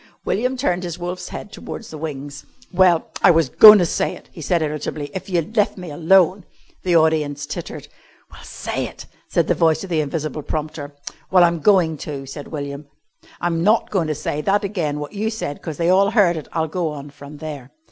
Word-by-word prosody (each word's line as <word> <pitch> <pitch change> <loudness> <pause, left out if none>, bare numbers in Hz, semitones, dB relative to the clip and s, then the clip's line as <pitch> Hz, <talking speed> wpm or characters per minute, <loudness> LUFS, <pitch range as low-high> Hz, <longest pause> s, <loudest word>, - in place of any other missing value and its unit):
William 250 +6 0
turned 180 -9 0
his 175 -2 -5
wolf's 180 +1 -5
head 205 - -8
towards 225 - -8
the 155 - -7
wings. 145 -1 -6 0.3
"Well, 180 -2 +3
I - - +6
was 165 -5 +4
goin' 215 - +10
to 180 - +3
say - - -1
it," - - -16
he 165 - -10
said 170 +2 +1
irritably, 150 -1 -4
"if 190 - -6
you'd 180 +4 -1
lef' 210 -2 +2
me 180 -4 -7
alone." 185 +4 +3 0.4
The 180 -2 +1
audience 155 -3 +2
tittered. 145 - -7 0.4
"Well, - - -13
say - - -4
it," - - -11 0.2
said - - +1
the - - +2
voice 160 0 +2
of 190 - -8
the 160 -2 +2
invisible 150 0 -3
prompter. 150 -1 -5 0.3
"Well, 185 -1 +6
I'm 170 -1 +2
going 170 -4 +3
to," 140 -2 -6
said 140 +2 -8
William. 140 -1 -6 0.5
"I'm 170 -1 0
not 215 +4 +2
goin' 180 -6 0
to 155 - -1
say 150 +1 -3
that 200 +6 +1
again 170 -8 -2
wot 150 +5 -7
you 215 +2 -1
said 220 -10 -5
'cause 160 -3 -6
they 170 +1 +2
all 195 +2 +4
heard 200 -6 +3
it. 155 - -6
I'll 160 -1 -1
go 170 +1 -2
on 145 -1 -8
from 145 +1 -12
there." 145 -4 -7
160 Hz, 210 wpm, -21 LUFS, 150-185 Hz, 0.5 s, goin